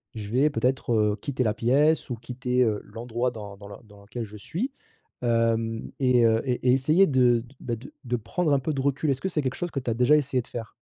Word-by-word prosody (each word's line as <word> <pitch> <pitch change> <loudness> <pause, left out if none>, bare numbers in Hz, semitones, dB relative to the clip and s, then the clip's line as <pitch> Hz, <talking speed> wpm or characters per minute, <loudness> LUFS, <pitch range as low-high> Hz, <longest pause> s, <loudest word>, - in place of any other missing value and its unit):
je 105 -2 -6
vais 135 +5 +3
peut-être, 130 -3 0
heu, 105 -1 +2
quitter 130 -3 -1
la 110 - +1
pièce 145 +8 +2
ou - - -1
quitter, 125 +2 -2
heu, 110 -3 +1
l'endroit 120 +2 -3
dans 105 -3 -9
dans 100 0 -11
le 100 - -8
dans 105 -1 -17
lequel 110 +4 -6
je 105 0 -11
suis, 190 - -4 0.5
hem 115 -1 0
et 125 -3 +4
heu 115 0 +3
et 125 - +2 0.2
et - - +6
essayer 155 +9 +4
de 125 -4 +4
d 125 +4 -17
bah, 120 - -2
de 120 - -12
de 120 0 0
prendre 145 +8 -1
un 140 - +3
peu 145 +4 -2
de 135 - -2
recul». 140 +2 0
Est-ce 135 - -1
que 190 - -1
c'est 160 -4 -1
quelque 130 - -2
chose 175 -1 -4
que 140 - -2
tu 125 - -4
as - - -1
déjà 125 +5 +5
essayé 135 -3 0
de - - -21
faire? 115 -2 -7
125 Hz, 255 wpm, -26 LUFS, 115-135 Hz, 0.5 s, et